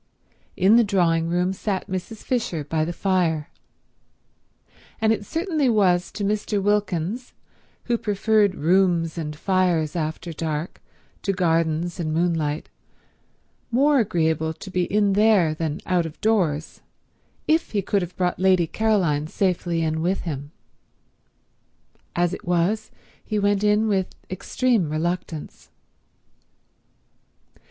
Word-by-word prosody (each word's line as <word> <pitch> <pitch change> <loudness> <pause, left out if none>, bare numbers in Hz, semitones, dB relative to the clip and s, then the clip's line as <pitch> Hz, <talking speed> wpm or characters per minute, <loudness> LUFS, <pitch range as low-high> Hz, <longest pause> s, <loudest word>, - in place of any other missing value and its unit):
In 195 +5 +5
the 240 - +6
drawing 170 -5 +1
room 180 +2 +1
sat 195 0 -3
Mrs. 190 +3 -5
Fisher 220 - -1
by 155 +2 -1
the 165 - -2
fire, 170 -4 0 1.5
and 220 0 +3
it 205 -2 -5
certainly 325 -5 0
was 185 -5 +2
to 205 - -4
Mr. 210 0 0
Wilkins, 205 +2 -1 0.5
who 235 -1 0
preferred 210 -1 +2
rooms 170 0 +2
and 155 -3 -4
fires 175 -3 +1
after 160 +1 -3
dark 155 +1 -4 0.4
to 200 - 0
gardens 165 -1 0
and 160 -2 -2
moonlight, 160 -2 0 1.0
more 275 +4 +3
agreeable 160 -7 0
to 190 - -10
be 180 -1 +1
in 205 0 +2
there 205 -6 +4
than 155 -1 -3
out 180 -2 +1
of 155 - -12
doors 175 -9 0 0.7
if 320 +2 +2
he 200 -2 0
could 200 +1 +1
have 175 0 -6
brought 180 -2 0
Lady 185 -2 +4
Caroline 175 -7 +1
safely 175 -2 0
in 160 0 -1
with 185 +4 0
him. 145 -4 -5 1.7
As 175 +1 +1
it - - -6
was, 180 +5 0 0.3
he 215 - -2
went 205 0 +1
in 210 +1 +3
with 190 -3 -1 0.2
extreme 205 - 0
reluctance. 165 0 -4
180 Hz, 125 wpm, -23 LUFS, 165-210 Hz, 1.7 s, the